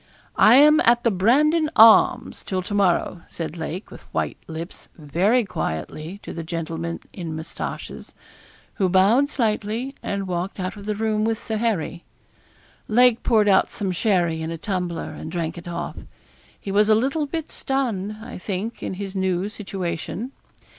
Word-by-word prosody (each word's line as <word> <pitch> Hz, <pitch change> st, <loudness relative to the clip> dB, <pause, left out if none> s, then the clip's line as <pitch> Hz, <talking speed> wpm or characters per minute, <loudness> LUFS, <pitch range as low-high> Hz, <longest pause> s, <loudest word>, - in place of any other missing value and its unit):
'I 220 Hz, +3 st, +7 dB
am 300 Hz, +3 st, +7 dB
at 235 Hz, +1 st, +4 dB
the 235 Hz, -, +3 dB
"Brandon 300 Hz, -, +3 dB
Arms" 225 Hz, 0 st, +6 dB
till 185 Hz, -1 st, -2 dB
to 205 Hz, -, -5 dB
morrow,' 185 Hz, -3 st, +1 dB
said 160 Hz, -1 st, -5 dB
Lake, 170 Hz, +4 st, -6 dB
with -, -, -11 dB
white -, -, -2 dB
lips, 165 Hz, +2 st, -8 dB
very 185 Hz, -, +1 dB
quietly, 155 Hz, -, -4 dB
to -, -, -7 dB
the 170 Hz, -, -5 dB
gentleman 165 Hz, 0 st, -4 dB
in 165 Hz, -4 st, -5 dB
moustaches, 160 Hz, +1 st, -7 dB, 0.7 s
who 190 Hz, -, +3 dB
bowed 205 Hz, +10 st, +4 dB
slightly, 225 Hz, +1 st, -1 dB
and 200 Hz, -1 st, -3 dB
walked 180 Hz, +2 st, -3 dB
out 185 Hz, +2 st, -3 dB
of 205 Hz, 0 st, -10 dB
the 210 Hz, -, -1 dB
room 215 Hz, 0 st, 0 dB
with 225 Hz, 0 st, 0 dB
Sir 220 Hz, +1 st, -4 dB
Harry. 200 Hz, -6 st, -1 dB, 0.8 s
Lake 245 Hz, +1 st, +4 dB
poured 215 Hz, -3 st, +3 dB
out 195 Hz, -2 st, +4 dB
some 195 Hz, -2 st, -3 dB
sherry 175 Hz, -4 st, +1 dB
in 160 Hz, -, -3 dB
a 165 Hz, -, -4 dB
tumbler, 180 Hz, -3 st, -3 dB
and 155 Hz, +1 st, -8 dB
drank 165 Hz, -2 st, -3 dB
it 175 Hz, 0 st, -10 dB
off. 170 Hz, -, -5 dB, 0.6 s
He 195 Hz, -, -6 dB
was 210 Hz, +2 st, +3 dB
a 215 Hz, -, +6 dB
little 275 Hz, +6 st, 0 dB
bit 320 Hz, +1 st, -5 dB
stunned, 215 Hz, -7 st, -2 dB
I 245 Hz, -3 st, -8 dB
think, 200 Hz, +4 st, -4 dB
in -, -, -4 dB
his 195 Hz, 0 st, -6 dB
new 190 Hz, 0 st, 0 dB
situation. 195 Hz, +2 st, -5 dB
195 Hz, 165 wpm, -23 LUFS, 170-225 Hz, 0.8 s, I